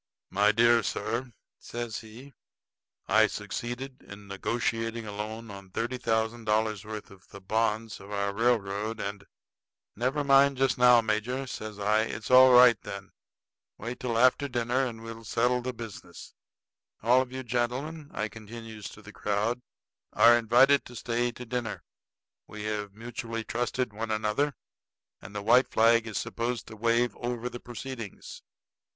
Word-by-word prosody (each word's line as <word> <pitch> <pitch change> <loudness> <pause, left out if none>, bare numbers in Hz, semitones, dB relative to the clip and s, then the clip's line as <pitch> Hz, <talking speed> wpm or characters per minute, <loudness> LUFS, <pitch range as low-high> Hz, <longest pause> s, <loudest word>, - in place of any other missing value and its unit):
"My 105 +2 +4
dear 115 +1 +5
sir," 115 +5 -3 0.3
says 120 -2 -5
he, 120 +6 -13 0.7
"I 110 +2 +5
succeeded 120 +6 -5
in 100 0 -12
negotiating 115 +3 -2
a 105 - -6
loan 110 +2 -6
on 100 -1 -10
thirty 120 +6 -3
thousand 115 -1 -1
dollars' 110 -1 +1
worth 105 -1 -7
of 95 -1 -17
the 100 - -11
bonds 110 +2 -1
of 100 - -12
our 100 -1 -1
railroad, 110 -1 0
and 100 -1 -4 0.4
" - - -65 0.3
"Never 130 +6 0
mind 140 0 +5
just 135 0 +2
now, 125 -1 +7
major," 115 +5 -1
says 110 -4 -7
I. 105 +1 +2
"It's 110 +1 -4
all 130 0 +9
right, 125 -3 +7
then. 100 0 -8 0.7
Wait 120 +3 -6
till 120 -3 -1
after 130 +4 +4
dinner, 125 +1 0
and 115 -2 -8
we'll 115 0 -8
settle 120 +3 +1
the 130 +1 -3
business. 110 -7 -10 0.7
All 125 +3 +5
of 130 -1 -5
you 130 0 -5
gentlemen," 130 +6 -2
I 105 - -2
continues 110 0 -9
to 105 - -14
the 105 +1 -12
crowd, 105 +6 -1 0.5
"are 120 +1 +7
invited 120 +5 +5
to 120 - -11
stay 120 +1 -1
to 125 - -9
dinner. 120 -2 -4 0.6
We 105 0 -8
have 105 -1 -3
mutually 115 0 -5
trusted 120 0 -2
one 110 +2 -4
another, 110 +7 0 0.7
and 100 - -11
the 100 - -3
white 125 +4 +5
flag 115 +1 +4
is 110 -3 -4
supposed 120 0 -3
to 110 - -9
wave 115 +2 +1
over 120 0 -3
the 120 - -8
proceedings." 120 -3 -8
115 Hz, 155 wpm, -28 LUFS, 105-125 Hz, 0.7 s, all